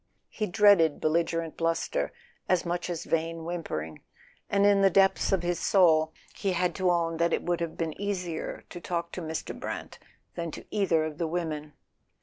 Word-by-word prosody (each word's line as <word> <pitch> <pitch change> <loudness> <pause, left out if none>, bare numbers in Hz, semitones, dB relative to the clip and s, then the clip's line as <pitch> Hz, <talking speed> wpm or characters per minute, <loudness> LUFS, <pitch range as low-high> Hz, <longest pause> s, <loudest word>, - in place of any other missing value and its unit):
He 215 - -3
dreaded 185 -5 +5
bel¬ 155 - +1
ligerent 165 -1 0
bluster 165 0 0 0.4
as 180 -1 +2
much 175 +1 -2
as 170 -2 -3
vain 165 0 -1
whimpering, 80 - -4 0.5
and 200 0 +3
in 200 -1 +5
the 195 - +6
depths 195 +1 +3
of 190 -3 +2
his 175 -1 0
soul 160 -6 +4 0.2
he 195 -2 -1
had 180 0 +1
to 185 -1 +2
own 165 -1 +1
that 170 0 +2
it - - 0
would 175 -1 -1
have 165 -1 -3
been 165 -2 -2
easier 180 -5 -3
to 175 - -7
talk 170 -1 -3
to 180 - -5
Mr. 160 -1 -4
Brant - - -6 0.3
than 170 -1 -4
to - - -9
either 185 -6 +2
of 155 -1 -6
the 165 - 0
women. 155 -3 -3
170 Hz, 185 wpm, -28 LUFS, 165-180 Hz, 0.5 s, the